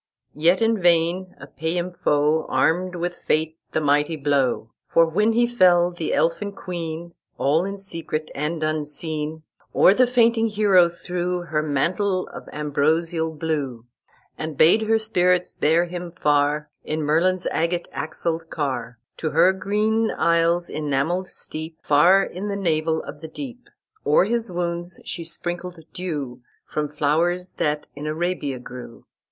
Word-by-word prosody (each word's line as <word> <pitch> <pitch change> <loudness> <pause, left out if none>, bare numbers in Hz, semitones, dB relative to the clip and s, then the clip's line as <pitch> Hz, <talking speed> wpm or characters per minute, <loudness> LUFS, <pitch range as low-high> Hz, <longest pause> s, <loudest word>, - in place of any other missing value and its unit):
"Yet 170 +7 +3
in 225 -2 +2
vain 175 +2 +2
a - - -9
paynim 170 +3 -3
foe 150 -2 +1
Armed 180 +2 +1
with 175 0 -3
fate 160 +1 -1
the - - +1
mighty 145 +2 +2
blow: 140 -6 0 0.2
For 165 - +6
when 210 +8 +2
he 240 +1 +4
fell, 180 -7 +4
the 170 -2 -4
Elfin 200 +5 0
queen, 170 -2 -5 0.2
All 155 +6 +2
in 200 +1 -4
secret 165 -5 -5
and 155 +3 -2
unseen, 155 0 -3 0.3
O'er 190 - +7
the 255 +4 +4
fainting 235 -2 +3
hero 200 -5 +4
threw 180 +1 -3
Her 155 -3 -1
mantle 180 +6 0
of - - -10
ambrosial 160 +3 0
blue, 145 -7 -3 0.5
And 155 -2 -5
bade 170 +10 +6
her 225 0 +4
spirits 180 -5 +2
bear 165 +3 +2
him 175 0 -6
far, 150 -2 +1
In 155 0 -2
Merlin's 175 +5 +2
agate 170 +1 -1
axled 165 +1 -3
car, 130 -5 -3 0.2
To 155 - -2
her 170 +5 +4
green 215 +3 +1
isle's 170 +1 +2
enamelled 155 +5 -1
steep, 160 -1 -7
Far 175 +7 +5
in 190 +3 -5
the 200 - -2
navel 160 -4 0
of 150 - -9
the 160 - -6
deep. 250 - -8 0.3
O'er - - +4
his 230 +2 -1
wounds 175 0 -3
she 170 - -4
sprinkled 175 +2 -5 0.2
dew 145 -9 -4 0.2
From 150 -1 -3
flowers 165 +5 0
that 150 0 0
in 145 +1 -6
Arabia 155 -4 -2
grew. 125 -1 -10
170 Hz, 145 wpm, -23 LUFS, 155-180 Hz, 0.5 s, O'er